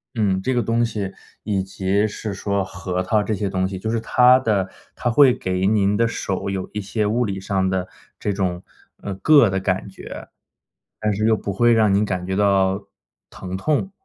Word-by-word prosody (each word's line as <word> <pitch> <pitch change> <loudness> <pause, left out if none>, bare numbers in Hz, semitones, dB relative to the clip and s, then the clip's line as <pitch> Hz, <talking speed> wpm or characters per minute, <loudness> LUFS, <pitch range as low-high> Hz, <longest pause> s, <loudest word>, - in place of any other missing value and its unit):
嗯， 100 -4 +1
这 130 +6 0
个 120 - +2
东 115 +2 +1
西， 105 -4 -3 0.3
以 100 -3 -1
及 95 +2 0
是 105 0 -5
说 100 0 -1
核 95 -1 -4
桃 105 +3 +1
这 110 - -1
些 100 0 -2
东 95 0 0
西， 95 -1 -5
就 110 +4 -3
是 115 0 0
它 125 +2 +5
的 105 -6 0 0.3
它 120 - -1
会 130 0 +6
给 95 0 -1
您 100 -1 +2
的 115 +1 +2
手， 100 -3 -3
有 95 -1 -3
一 105 - -3
些 105 +1 -2
物 120 +4 +1
理 95 -2 -3
上 95 0 -1
的 95 -1 -1 0.3
这 105 - -1
种， 90 -2 -2 0.4
呃， 100 - -4
“硌” 140 -9 +6
的 95 0 -1
感 95 0 -1
觉， 95 - -10 0.7
但 105 -1 0
是 105 +2 0
又 110 -1 +3
不 100 - -4
会 120 +5 +3
让 110 -3 +4
您 100 +2 +3
感 95 -3 -2
觉 95 - -1
到 100 -1 +2 0.4
疼 95 0 -7
痛。 155 - -1
100 Hz, 220 characters per minute, -21 LUFS, 95-110 Hz, 0.7 s, 会